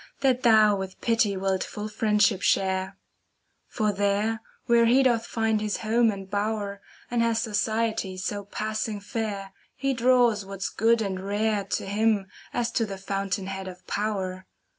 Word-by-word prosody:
That 260 -2 +2
thou 215 -4 +6
with 190 -1 -6
pity 225 -4 +1
wilt 190 0 0
full 210 0 -6
friendship 210 -2 +2
share; 190 0 +1 0.7
For 215 -3 0
there, 205 +3 0 0.2
where 235 -1 +4
he 260 +3 +5
doth 235 -3 +2
find 220 -2 0
his 210 -1 -1
home 225 +1 +2
and 195 -2 -4
bower 205 0 -2
* - - -26
And 240 -1 +1
has 230 -1 +2
society 220 -3 -1
so 200 +2 -3
passing 215 +1 -3
fair, 200 -2 -4 0.2
He 275 0 0
draws 240 -3 +3
what's 195 -1 -4
good 225 +1 +2
and 190 -2 -3
rare 205 0 0
To - - -2
him, 210 0 +1 0.3
as 235 -1 -1
to 230 - +1
the 195 -1 -6
fountain 195 0 -2
head 190 0 -5
of 180 0 -10
power. 190 -3 -3
210 Hz, 160 wpm, -26 LUFS, 195-225 Hz, 0.7 s, thou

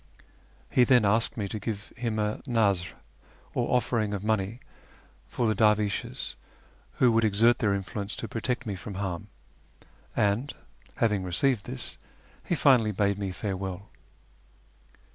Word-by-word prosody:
He 125 - +5
then 125 -3 +5
asked 110 +4 +1
me 105 -3 -1
to 110 - -4
give 105 -1 -5
him 115 -2 -2
a 105 0 -1
nazr, 100 -7 +1 0.6
or - - +2
oflering 110 -4 -1
of 100 - -5
money, 110 +1 0 0.7
for 120 - -1
the 110 - +3
dervishes, 105 -2 +1 0.6
who 125 - +4
would 115 0 +3
exert 110 +3 +4
their 100 -3 +2
influence 100 +1 -4
to 115 - -5
protect 120 +3 -2
me 105 -3 -3
from 95 +2 -7
harm, 95 0 -3 0.9
and, 105 +7 +1 0.4
having 105 -4 +1
received 100 +5 +1
this, 65 - -6 0.4
he 175 - 0
finally 125 -8 +4
bade 100 0 +1
me 100 -2 -2
farewell. 95 0 -4
105 Hz, 140 wpm, -28 LUFS, 100-115 Hz, 0.9 s, He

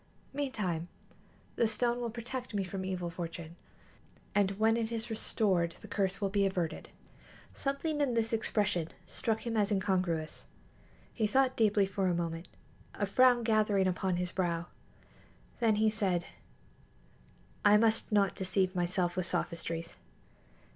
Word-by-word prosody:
Meantime, 210 - -2 0.7
the 230 - +4
stone 240 +2 +1
will 235 - -1
protect 240 +1 -6
me 200 - +1
from 190 +1 -5
evil 180 -2 -3
fortune, 170 -1 -6 0.8
and 200 -2 +3
when 220 +1 +4
it 230 -1 -1
is 230 0 -4
restored 190 -6 +1
the - - -10
curse 195 -2 -1
will 200 - +1
be 200 0 +2
averted." 185 -4 -1 0.6
Something 295 +2 -1
in 260 -4 +1
this 225 0 0
expression 210 -6 0 0.2
struck 225 0 -2
him 230 -1 -2
as 210 -1 +2
incongruous. 185 -5 0 0.7
He 220 -2 +1
thought 260 +3 +3
deeply 210 -3 +4
for 195 0 -1
a 175 - +2
moment, 165 0 -3 0.5
a 205 - 0
frown 245 +3 +5
gathering 215 -3 +3
upon 185 0 0
his 180 0 -2
brow. 170 -2 -1 0.9
Then 225 -3 +3
he 215 +1 +3
said: 190 -5 0 1.4
"I 205 0 +7
must 220 0 +2
not 200 -2 +3
deceive 185 0 0
myself 175 0 0
with 185 -1 -1
sophistries. 165 -1 -3
200 Hz, 140 wpm, -32 LUFS, 180-225 Hz, 1.4 s, I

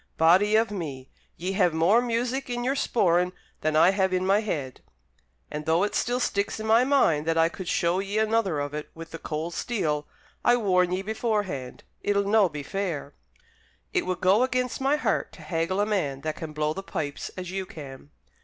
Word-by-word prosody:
Body 185 +6 +5
of 225 0 +3
me! 140 -9 -6 0.3
ye 180 +3 -3
have 180 -4 +2
more 185 +9 +4
music 245 +3 -1
in 240 0 -2
your 260 +2 +1
sporran 180 -9 +2 0.3
than 155 0 0
I 165 +4 +6
have 190 -1 +1
in 185 0 +1
my 195 +2 +4
head! 145 - -4 0.7
And, 150 0 -5
though 165 +3 +3
it 205 - -1
still 245 +1 0
sticks 200 -3 -1
in 220 - -4
my 225 +2 +5
mind 170 - +3
that 165 0 +1
I 165 0 +4
could 180 +1 -8
show 170 +2 +1
ye 200 +2 -3
another 220 -7 +1
of 145 0 -3
it 150 0 -5
with 165 0 -9
the 165 - -7
cold 160 +2 -4
steel, 155 -12 -1 0.4
I 240 0 +5
warn 180 -5 +2
ye 185 +1 -1
beforehand 205 - -2 0.2
it'll 200 0 +1
no 205 -2 +4
be 150 -2 -6
fair! 165 -5 -3 0.8
It - - 0
would 185 -1 -2
go 190 +5 +4
against 255 0 0
my 275 +2 +3
heart 300 - -1
to - - -12
haggle 170 +2 -1
a 205 - +3
man 150 -11 -1
that 155 +1 -3
can 160 -1 -6
blow 150 0 -1
the 195 - -5
pipes 145 -6 -4
as 180 -1 -5
you 190 -1 -3
can!" 140 -3 -10
185 Hz, 200 wpm, -26 LUFS, 160-215 Hz, 0.8 s, I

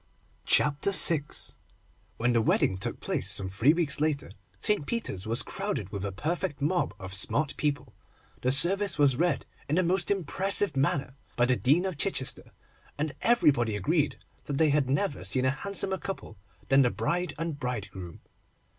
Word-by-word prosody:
CHAPTER 150 +5 +3
VI 165 -6 +7 0.9
WHEN 120 +1 0
the 115 - +2
wedding 95 - +1
took 95 - -4
place, 95 - -3
some 100 -1 -2
three 110 +9 +3
weeks 155 -4 0
later, 150 -6 -1 0.3
St. 210 - -1
Peter's 110 - -4
was 115 +2 0
crowded 190 - -4
with 100 -2 -5
a 100 - -3
perfect 150 - -3
mob 150 - -1
of 95 -2 -8
smart 140 +9 0
people. 140 -5 -3 0.5
The 130 - +1
service 185 +6 +6
was 140 -3 +3
read 175 +6 0 0.2
in 150 - +1
the 185 - +2
most 175 +1 +1
impressive 195 -1 +1
manner 135 -1 0 0.2
by 120 - +2
the 125 0 +2
Dean 145 +9 +2
of 185 -6 -5
Chichester, 170 -9 -1 0.5
and 150 0 -3
everybody 140 - +2
agreed 150 - 0 0.3
that 145 - -5
they 160 0 +3
had 140 -3 +1
never 140 - -1
seen 125 +7 0
a 130 - +3
handsomer 190 +5 -3
couple 190 - -7 0.3
than 135 0 +5
the 125 - +3
bride 175 +4 -2
and 165 -2 -4
bridegroom. 100 - -6
145 Hz, 165 wpm, -27 LUFS, 120-175 Hz, 0.9 s, VI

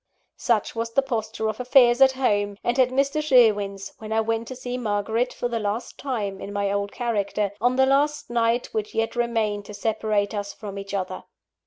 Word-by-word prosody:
Such 230 -3 0
was 230 0 -3
the 275 - +3
posture 220 -4 -2
of 215 +1 -3
affairs 250 0 +5
at 265 0 +7
home, 205 -6 0
and 240 +2 0
at 255 -1 +5
Mr. 275 +3 +1
Sherwin's, 205 -8 +3
when 220 0 -8
I 220 - +2
went 225 +1 -1
to 260 - -6
see 250 -1 -5
Margaret 225 +1 -1
for 245 - -3
the 235 -1 -2
last 210 +3 -3
time 210 -8 -3
in 200 - -6
my 200 -1 -1
old 200 0 -1
character, 210 -4 -1
on 245 +2 +3
the 265 0 +4
last 295 +2 +1
night 235 +1 +1
which 215 -1 -3
yet 225 +1 0
remained 225 -4 0
to 210 - -9
separate 215 -1 0
us 205 -1 -4
from 200 -2 -7
each 195 0 -6
other. 190 -2 -4
225 Hz, 200 wpm, -24 LUFS, 205-250 Hz, -, at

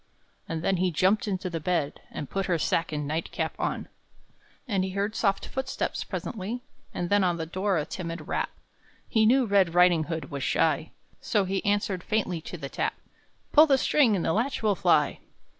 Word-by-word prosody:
And 165 0 -3
then 190 +1 +2
he 185 +1 +2
jumped 190 +6 +2
into 190 -2 -2
the 170 -2 -3
bed, 155 -3 -1
And 145 - -6
put 195 +5 -2
her 175 -3 +2
sack 165 +1 0
and 150 -1 -3
night 160 +3 -2
cap - - -2
on. - - -2 0.8
And 195 -5 +1
he 190 - -2
heard 200 +3 -1
soft 195 -3 +1
footsteps 265 0 -3
presently, 230 +2 -5 0.3
And 175 +1 -4
then 205 -1 +4
on 175 -2 +1
the 165 - -3
door 185 +3 0
a 150 - -1
timid 170 -2 -6
rap; - - -1 0.6
He 220 -1 +3
knew 260 +2 +4
Red 195 -5 +3
Riding 175 -3 +5
hood 160 -4 -5
was 140 -1 -4
shy, - - +1 0.3
So 205 -4 +1
he 190 +1 -2
answered 205 -3 0
faintly 190 -6 -1
to - - -7
the - - -5
tap: - - -2 0.6
"Pull 310 +1 +8
the 275 -2 +5
string 265 -5 +3
and 175 - -1
the 160 - +2
latch 235 +3 -1
will 210 -2 +4
fly!" 170 -5 +2
185 Hz, 195 wpm, -27 LUFS, 165-210 Hz, 0.8 s, Pull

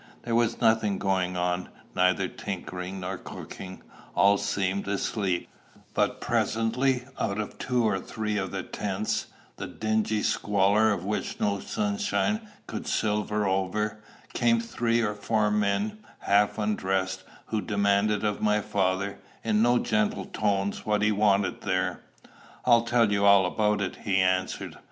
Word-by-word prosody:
There 120 - -3
was 115 0 +2
nothing 110 -4 +3
going 95 -2 0
on, 90 0 -1 0.2
neither 90 -1 +2
tinkering 95 0 -6
nor 95 0 -4
cooking; 95 0 -9 0.3
all 100 0 +5
seemed 100 0 -1
asleep; 100 -2 -1 0.5
but - - +1
presently 125 +3 +1 0.2
out 100 -1 -1
of 105 - -5
two 125 -2 +1
or 95 -3 +1
three 105 +2 -3
of 95 -2 -1
the 95 0 -4
tents, 105 +1 -2 0.3
the - - -5
dingy 110 -1 0
squalor 105 +2 +3
of 95 -3 -2
which 105 +1 -3
no 100 -1 0 0.2
moonshine 210 +1 0 0.2
could - - -6
silver 105 -1 0
over, 105 +3 -1 0.3
came 115 -1 +3
three 115 0 0
or 105 -2 0
four 105 0 0
men, 105 - 0 0.2
half 100 +1 +3
undressed, 95 -3 -1 0.3
who 110 -1 0
demanded 100 0 +1
of 105 -1 -1
my 105 0 +3
father, 100 -1 -1 0.2
in 110 -1 +2
no 120 +1 +4
gentle 105 -4 0
tones, 100 -1 -1
what 105 0 +1
he 105 - +4
wanted 100 -1 +2
there. 95 -1 -1 0.6
"I'll 115 -1 +5
tell 115 -2 +3
you 100 0 +1
all 100 -1 +7
about 105 +2 +1
it," 95 - -3
he 100 - -1
answered. 95 0 0
105 Hz, 145 wpm, -27 LUFS, 95-110 Hz, 0.6 s, all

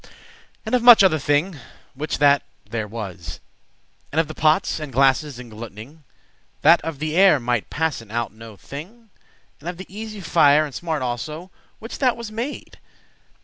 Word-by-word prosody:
And - - -5
of 250 - +3
much 240 -3 +9
other 165 -5 +4
thing 145 +4 0 0.3
which 150 +3 -3
that 145 -1 +4 0.3
there 110 0 -4
was? 95 -6 -7 0.7
And 155 - 0
of 165 - +2
the 155 - -7
pots 155 +3 +1
and 150 -3 -6
glasses 135 +1 +2
engluting,* 115 -3 -9
*sealing 155 - -20
up 150 - -35
That - - +6
of 165 -2 -5
the 155 +2 -3
air 185 -5 +6
might 120 -3 -1
passen 150 -8 -2
out 115 0 -3
no 110 -1 -12
thing? 205 - -11 0.5
And 170 - -6
of 175 - -6
the 185 - -8
easy* 215 +2 -8
fire, 155 -4 +4
and 145 - -9
smart 160 -3 -3
also, 120 -1 -2
*slow 170 +4 -9
quick - - -36
Which 225 - -7
that 255 -4 +2
was 235 -2 -7
made? 235 +6 -6
155 Hz, 185 wpm, -22 LUFS, 125-185 Hz, 0.7 s, much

